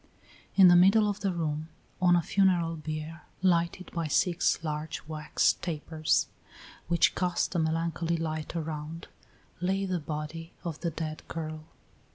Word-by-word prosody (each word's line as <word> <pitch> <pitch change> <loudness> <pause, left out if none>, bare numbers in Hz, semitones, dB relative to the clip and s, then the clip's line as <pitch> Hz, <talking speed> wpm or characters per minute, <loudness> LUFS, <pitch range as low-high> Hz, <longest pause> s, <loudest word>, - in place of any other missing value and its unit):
In 190 -2 +8
the 175 - +8
middle 200 +4 +6
of 205 0 -2
the 195 -2 0
room, 160 -2 -2 0.3
on 175 -1 +5
a 170 - +2
funeral 175 -3 +2
bier, 155 +1 -6 0.2
lighted 175 0 +1
by 170 -2 -2
six 175 +2 +2
large 150 0 -4
wax 155 -1 +1
tapers, 155 -2 0 0.6
which 170 +1 +3
cast 180 0 0
a 175 - +1
melancholy 165 +1 0
light 155 0 -4
around, 160 0 -5 0.5
lay 190 +2 0
the 185 -2 -1
body 155 +2 -6
of 165 -3 -4
the 170 - -1
dead 155 -1 -5
girl. 155 -1 -5
165 Hz, 145 wpm, -29 LUFS, 155-175 Hz, 0.6 s, In